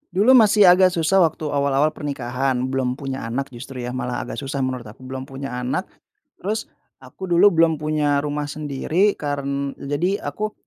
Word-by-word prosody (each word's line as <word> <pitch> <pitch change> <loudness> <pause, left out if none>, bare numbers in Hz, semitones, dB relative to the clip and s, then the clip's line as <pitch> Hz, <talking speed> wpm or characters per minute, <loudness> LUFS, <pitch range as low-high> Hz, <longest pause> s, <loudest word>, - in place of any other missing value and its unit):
Dulu 210 +7 +5
masih 215 -4 +6
agak 185 +1 +6
susah 170 +3 +3
waktu 160 -3 +1
awal-awal 140 +1 +2
pernikahan, 130 -3 -2
belum 130 -1 -1
punya 135 -3 -5
anak 135 +4 -3
justru 125 +1 -8
ya, 125 - -4
malah 125 -1 -3
agak - - -6
susah 135 -1 -3
menurut 130 -3 -3
aku. 110 +4 -13
Belum 130 +1 -6
punya 135 0 -6
anak, 125 +1 -1 0.5
terus 215 +4 -3 0.3
aku 190 - -9
dulu 180 +3 +5
belum 165 -2 +3
punya 150 -2 +1
rumah 145 0 -3
sendiri 155 +7 0
karen 140 -1 -3
jadi 165 +8 -1
aku, 215 0 -4
140 Hz, 170 wpm, -22 LUFS, 130-165 Hz, 0.5 s, masih